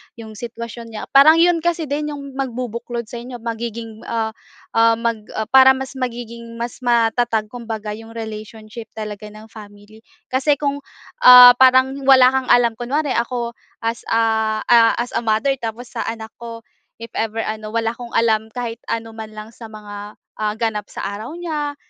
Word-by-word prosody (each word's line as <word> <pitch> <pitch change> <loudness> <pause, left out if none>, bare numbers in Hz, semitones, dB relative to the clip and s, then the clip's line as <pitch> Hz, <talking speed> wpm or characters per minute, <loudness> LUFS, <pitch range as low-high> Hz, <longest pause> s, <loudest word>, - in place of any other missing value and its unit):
’yong 220 -2 -11
sitwasyon 235 -1 -8
niya. 215 - -5
Parang 295 +4 +7
’yon 340 0 +4
kasi 340 0 -1
din 295 +1 -2
’yong 280 -1 -8
magbubuklod 240 -2 -4
sa 240 - -7
inyo, 245 -1 -9
magiging 230 -1 -5
ah, 225 -1 -1 0.5
ah, 230 0 +5
mag, 230 -2 -3
ah, 220 -1 -3
para 265 0 +7
mas 265 0 -7
magiging 235 -1 -6
mas 235 0 -5
matatag 230 -2 +1
kumbaga 220 -3 -6
’yong 225 0 -12
relationship 220 0 -8
talaga 210 -1 -6
ng 215 +1 -13
family. 205 0 -14 0.3
Kasi 270 +3 +2
kung 285 0 -2 0.5
ah, 250 0 +12
parang 260 0 +6 0.2
wala 260 -1 +8
kang 265 -1 -1
alam, 240 -1 +4
kunware 275 +4 -1
ako 235 0 -3 0.3
as 230 +1 -3
a 220 -1 +1
ah, 230 -1 +6
as 240 - -5
a - - +2
mother 220 +3 +1
tapos 235 +2 -6
sa - - -4
anak 225 -1 -6
ko, 230 -1 -9 0.4
if 230 - -9
ever 225 0 -2
ano, 215 0 -5
wala 225 0 0
akong 235 0 -9
alam 220 -1 +2
kahit 235 -2 -5
anuman 225 -1 -5
lang 215 +1 -8
sa 230 -1 -11
mga 210 -1 -10 0.2
ah, 210 -1 0
ganap 220 -3 -2
sa - - -8
araw 215 +10 -5
niya 300 -4 -4
230 Hz, 170 wpm, -20 LUFS, 220-250 Hz, 0.5 s, ah